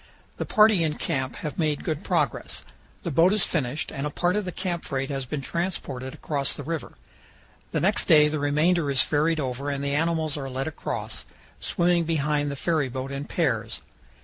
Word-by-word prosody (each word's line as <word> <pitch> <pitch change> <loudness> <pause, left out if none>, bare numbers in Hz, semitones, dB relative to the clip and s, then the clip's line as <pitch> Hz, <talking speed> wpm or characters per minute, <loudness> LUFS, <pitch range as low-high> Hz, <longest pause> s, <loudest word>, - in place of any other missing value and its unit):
The - - -3
party 215 -4 +5
in 155 -2 0
camp 130 -1 -2
have 150 - -4
made 155 -3 +1
good 155 -3 -2
progress. - - -1 0.4
The 170 - -2
boat 165 +7 +5
is 210 - +5
finished 145 -2 -1
and 140 +2 -2
a - - -2
part 175 +5 +1
of 210 -1 0
the 180 - -3
camp 175 -2 -3
freight 135 0 -2
has 135 -1 -2
been 140 +3 -3
transported 135 -5 -3
across 140 -2 0
the - - -6
river. 165 -2 -4 0.8
The - - -1
next - - +2
day 150 -1 +7
the 150 0 -1
remainder 150 +3 +2
is 135 -2 +4
ferried 155 +2 +1
over 135 +1 -2
and 140 -1 -2
the 140 0 0
animals 160 -1 +1
are 135 -2 -4
led 130 +1 -2
across, 160 - -4 0.3
swimming 170 -1 +2
behind 150 -2 +1
the 140 - -3
ferryboat 135 -4 -1
in 140 +1 -4
pairs. 115 -11 -1
150 Hz, 190 wpm, -26 LUFS, 135-165 Hz, 0.8 s, day